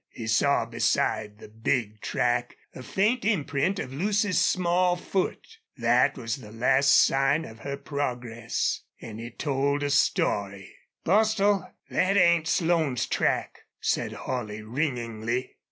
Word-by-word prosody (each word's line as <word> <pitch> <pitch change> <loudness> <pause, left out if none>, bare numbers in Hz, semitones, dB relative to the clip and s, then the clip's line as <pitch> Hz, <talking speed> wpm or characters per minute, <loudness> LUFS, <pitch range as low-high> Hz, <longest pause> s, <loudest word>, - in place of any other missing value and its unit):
He 115 - -8
saw 115 +6 +2
beside 105 -1 0
the - - -12
big 110 0 -2
track 120 0 -1 0.2
a - - -9
faint 210 - 0
imprint 185 -3 0
of 130 -8 -5
Lucy's 200 +5 +1
small 180 0 +2
foot. 185 +1 -2 0.3
That - - +3
was 115 -1 -3
the 110 -5 -12
last 130 +5 +2 0.2
sign 135 +4 +1
of 110 0 -12
her 140 +3 -5
progress 120 -5 -3 0.2
and 110 0 -8
it 120 0 -9
told 140 0 0
a 145 - -1
story. 100 -8 0 0.3
"Bostil, 205 -1 +2 0.2
thet 195 +2 +1
ain't 170 -3 +4
Slone's 160 -7 +1
track," - - -1 0.2
said - - -1
Holley, 110 -4 -5
ringingly. 120 -2 -3
140 Hz, 130 wpm, -26 LUFS, 115-175 Hz, 0.3 s, ain't